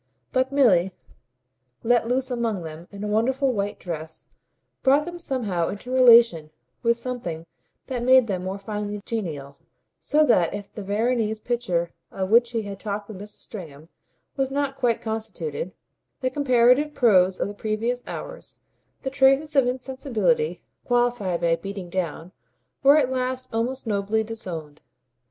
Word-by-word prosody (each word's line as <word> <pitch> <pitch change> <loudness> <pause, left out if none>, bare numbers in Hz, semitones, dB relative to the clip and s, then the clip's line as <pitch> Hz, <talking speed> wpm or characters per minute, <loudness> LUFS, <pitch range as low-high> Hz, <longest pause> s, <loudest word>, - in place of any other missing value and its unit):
But 260 +1 +1
Milly, 190 -10 +4 0.9
let 235 0 +3
loose 255 +1 0
among 230 -6 -1
them 160 +2 -9
in 200 0 -8
a - - -2
wonderful 255 +5 +1
white 205 -1 -2
dress, 160 -2 -6 0.6
brought 280 +3 +4
them 345 0 -7
somehow 215 - -1
into 205 +5 -6
relation 235 -11 +6 0.3
with 235 0 +2
something 230 -11 -4 0.4
that 250 -2 -3
made 255 0 +6
them 190 -4 -3
more 190 +1 -3
finely 205 0 -5
genial; 150 -11 -4 0.4
so 305 +1 +3
that 190 - +3
if 205 -1 -8
the 210 - -6
Veronese 220 +2 0
picture 200 -8 -1 0.2
of 190 +1 -4
which 235 +1 +5
he 230 -2 -2
had 200 -1 -7
talked 205 0 -4
with 205 -4 -8
Mrs. 210 0 -10
Stringham 160 -6 -10 0.5
was 270 -1 0
not 275 0 -1
quite 240 -4 0
constituted, 210 -8 -4 0.5
the 255 0 0
comparative 260 +2 +3
prose 190 -6 +4
of - - 0
the 205 - -6
previous 220 +4 -2
hours, - - -7 0.5
the 265 - -2
traces 275 +3 +3
of 270 -3 +5
insensibility 265 - -1 0.2
qualified 240 -8 +1
by 170 -1 +3
"beating 195 0 -7
down," 170 -1 -3 0.5
were 280 +2 +7
at 265 -4 +2
last 255 0 -2
almost 245 +4 -1
nobly 210 +1 0
disowned. 170 -9 -7
225 Hz, 150 wpm, -24 LUFS, 190-255 Hz, 0.9 s, were